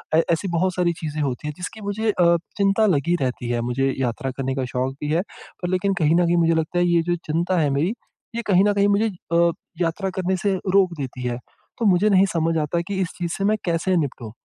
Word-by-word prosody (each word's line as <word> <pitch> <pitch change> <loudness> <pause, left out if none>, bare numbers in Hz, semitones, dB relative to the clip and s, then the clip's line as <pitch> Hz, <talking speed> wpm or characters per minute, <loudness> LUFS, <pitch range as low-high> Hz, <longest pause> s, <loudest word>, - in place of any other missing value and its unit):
ए 165 - +5
ऐसी 170 +4 0
बहुत 185 +1 +1
सारी 175 -1 +1
चीज़ें 155 -1 -3
होती 140 0 -2
हैं 150 - -3
जिसकी 185 +4 -7
मुझे 210 +2 -1
अ, 170 -3 +4 0.2
चिंता 200 +2 +3
लगी 170 +5 +1
रहती 125 -2 -2
है, 120 -1 0
मुझे 130 +3 0
यात्रा 130 +2 -2
करने 130 0 -3
का 135 -2 -1
शौक 130 +1 -1
भी 150 0 -2
है 165 - +2 0.4
पर 175 - -2
लेकिन 185 +2 +1
कहीं 155 +2 +4
न 175 0 +4
कहीं 175 - +3
मुझे 165 0 +3
लगता 160 +2 -1
है 175 - +3
ये 170 -1 +3
जो 175 +1 0
चिंता 170 +4 0
है 150 -3 +2
मेरी, 140 +6 +1 0.5
ये 235 - -1
कहीं 190 -2 +5
न 205 - +3
कहीं 200 0 +3
मुझे 205 +2 +3 0.3
अ, 170 0 +4 0.3
यात्रा 175 +3 0
करने 190 0 0
से 200 +2 0 0.2
रोक 190 -3 +4
देती 130 -2 -5
है। 120 -1 -2 0.4
तो 230 - -1
मुझे 200 +1 +4
नहीं 195 -1 +5
समझ 165 0 +1
आता 155 +2 0
कि 200 - -3
इस 180 - -1
चीज़ 175 -2 -3
से 195 - -2
मैं 215 +1 +2
कैसे 175 +2 +1
निपटूँ? 135 -7 -3
170 Hz, 240 wpm, -22 LUFS, 145-190 Hz, 0.5 s, ए